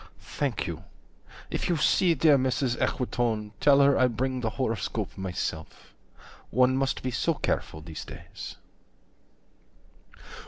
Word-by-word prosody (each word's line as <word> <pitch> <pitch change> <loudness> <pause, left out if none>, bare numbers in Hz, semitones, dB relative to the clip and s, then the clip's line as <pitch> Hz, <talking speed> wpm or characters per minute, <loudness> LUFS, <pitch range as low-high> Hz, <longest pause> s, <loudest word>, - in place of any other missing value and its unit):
Thank - - -1
you. - - -5 0.7
If - - -2
you 170 - +2
see 170 +2 +3
dear 150 0 +5
Mrs. 130 -1 +1
Equitone, 115 -4 -1
Tell 140 -1 +6
her 140 0 +5
I 130 - +5
bring 130 +2 -2
the 115 - 0
horoscope 115 -4 -2
myself: 90 -4 -5 0.6
One 125 +2 +3
must 135 0 -1
be 130 - -1
so 160 +7 0
careful 80 - -2
these 80 0 -7
days. - - -9
130 Hz, 125 wpm, -27 LUFS, 110-140 Hz, 0.7 s, Tell